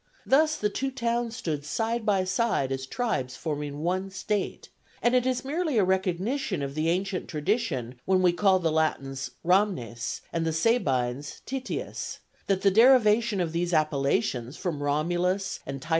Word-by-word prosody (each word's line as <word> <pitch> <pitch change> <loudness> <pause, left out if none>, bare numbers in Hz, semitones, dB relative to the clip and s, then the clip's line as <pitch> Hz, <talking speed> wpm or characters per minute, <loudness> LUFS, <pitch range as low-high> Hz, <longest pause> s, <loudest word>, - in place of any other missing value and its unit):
Thus 310 +3 +4
the 210 -5 0
two 270 +5 -1
towns 235 -2 -1
stood 150 -7 -3
side 225 +8 -2
by 195 -3 +3
side 185 - 0
as 135 0 -3
tribes 135 - -2
forming 150 -2 -4
one 185 +3 -1
state, 195 +1 -3 0.3
and 240 - +2
it 250 0 +3
is 255 0 -1
merely 310 -1 -1
a 210 - +5
recognition 190 - 0
of 140 0 -4
the 155 +2 0
ancient 185 +2 -1
tradition 145 - -2
when 185 -1 +3
we 175 -1 +5
call 190 +1 +4
the 165 -3 0
Latins 135 -4 -1 0.2
Ramnes, 170 - 0
and 165 - 0
the 160 0 0
Sabines 145 - 0
Tities; 265 0 -4 0.3
that 195 -1 +1
the 195 - +5
derivation 225 -2 +5
of 170 -3 0
these 170 +1 0
appellations 140 -3 0
from 170 -7 -3
Romulus 175 +6 0
and 135 -1 -5
T. 155 - -11
185 Hz, 160 wpm, -27 LUFS, 150-225 Hz, 0.3 s, a